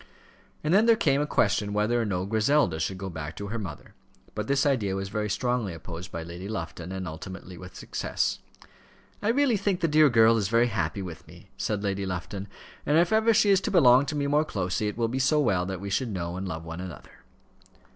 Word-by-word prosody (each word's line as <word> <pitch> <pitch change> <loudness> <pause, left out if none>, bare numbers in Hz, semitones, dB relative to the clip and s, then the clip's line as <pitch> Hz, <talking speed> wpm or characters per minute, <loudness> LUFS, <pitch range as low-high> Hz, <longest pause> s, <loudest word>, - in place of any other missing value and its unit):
And 155 +3 +1
then 215 +4 +5
there 230 - +7
came 140 -9 +2
a 150 - -1
question 105 -5 +1
whether 110 +3 +1
or - - -1
no 95 -3 -1
Griselda 110 - +2
should 95 +4 -2
go 95 +1 -5
back 80 -3 -6
to 100 0 -6
her 115 +2 -3
mother; 100 -4 -8 0.4
but 105 0 -4
this 140 +1 +2
idea 110 -9 +1
was 95 0 -3
very 105 +1 -2
strongly 115 -4 -1
opposed 85 +2 -8
by 85 - -5
Lady 85 +3 -8
Lufton, 85 -3 -5
and 95 -1 -4
ultimately 90 +3 -8
with 90 +1 -11
success. - - -2 0.8
"I 210 - -2
really 250 -1 +3
think 195 -2 0
the 170 - +1
dear 155 -1 +5
girl 115 -1 +5
is 105 -3 0
very 115 +3 +3
happy 95 -3 -2
with 85 -3 -9
me," - - -16
said 105 -1 -2
Lady 100 -1 -1
Lufton; 95 +2 -5 0.4
"and 150 +2 +2
if 170 +4 +3
ever 220 +1 +4
she 215 -2 +4
is 195 -1 +4
to - - -2
belong 135 -6 +5
to 150 - -3
me 145 -1 0
more 145 +2 +3
closely, 95 -6 -2
it 105 - -4
will 115 -1 +1
be 130 +3 -2
so 140 +4 +3
well 95 -10 +1
that 95 -2 -4
we 100 +1 -6
should 125 +4 0
know 85 -4 -4
and 95 +1 -4
love 80 -2 -5
one 85 +2 -6
another." 90 -3 -10
105 Hz, 225 wpm, -27 LUFS, 95-140 Hz, 0.8 s, there